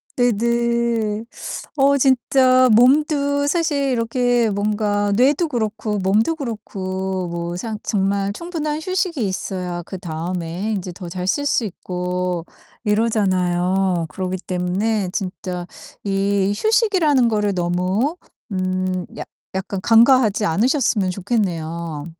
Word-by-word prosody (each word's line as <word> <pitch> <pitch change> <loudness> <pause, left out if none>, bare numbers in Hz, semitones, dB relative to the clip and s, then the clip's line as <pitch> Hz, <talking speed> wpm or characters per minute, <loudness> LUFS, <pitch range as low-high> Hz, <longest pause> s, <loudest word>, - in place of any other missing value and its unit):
네네. 235 -2 +1 0.5
어 280 +1 +4
진짜 255 -1 +4
몸도 285 +3 +3
사실 290 -4 +1
이렇게 240 0 +1
뭔가 205 0 0
뇌도 280 - +3
그렇고 220 -4 -2
몸도 210 - +2
그렇고 190 - -4
뭐 170 0 -4
상 220 +2 -4
정말 200 0 0
충분한 310 - -3
휴식이 365 - -1
있어야 180 -2 -3
그다음에 175 +2 -4
인제 185 -2 -4
더 180 -1 -8
잘 180 +1 -4
쓸 285 +9 +1
수 240 -5 +1
있고 180 -2 -3 0.4
이러잖아요. 190 -5 +1
그러기 185 0 -3
때문에 185 +3 0
진짜 180 -2 -4 0.4
이 195 0 +1
휴식이라는 360 - +3
거를 210 -3 +1
너무 185 - 0 0.3
음 185 -1 -1
약 - - -6 0.3
약간 190 0 -3
간과하지 225 -2 +5
않으셨으면 215 - +2
좋겠네요. 170 -6 -2
205 Hz, 240 characters per minute, -20 LUFS, 185-245 Hz, 0.5 s, 간과하지